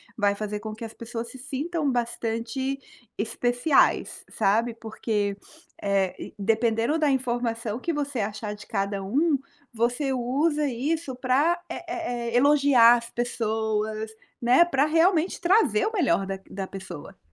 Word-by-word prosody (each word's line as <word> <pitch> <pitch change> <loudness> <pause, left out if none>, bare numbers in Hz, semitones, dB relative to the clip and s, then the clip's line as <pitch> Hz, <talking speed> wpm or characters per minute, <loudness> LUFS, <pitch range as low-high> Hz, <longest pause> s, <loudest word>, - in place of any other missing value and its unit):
vai 205 -3 +2
fazer 210 0 -4
com 215 0 -6
que 225 +1 -7
as 225 - -9
pessoas 230 0 -6
se - - -10
sintam 295 +3 -2
bastante 240 +2 -2 0.4
especiais, 245 +6 +1
sabe, 230 +4 +1
porque, 215 -3 -2 0.5
eh, 195 -2 -1
dependendo 225 +6 +1
da 300 - +3
informação 240 -3 -1
que 335 - -2
você 285 -4 -2
achar 210 0 -3
de 210 0 -11
cada 200 -1 -2
um, 285 - +2 0.4
você 245 +4 0
usa 290 +5 +1
isso 275 +3 -2
pra, 275 +7 +2
eh - - -6
eh 340 -7 -3 0.2
eh, - - +4
elogiar 275 -4 +6
as 235 0 -7
pessoas, 220 -2 -2 0.3
né, 250 +8 +6
para 290 -4 +2
realmente 330 +2 +2
trazer 345 - +3
o 440 - 0
melhor 195 - +2
da 195 0 -4
q 190 - -18
da 195 0 -3
pessoa. 185 -5 -9
240 Hz, 145 wpm, -26 LUFS, 215-285 Hz, 0.5 s, elogiar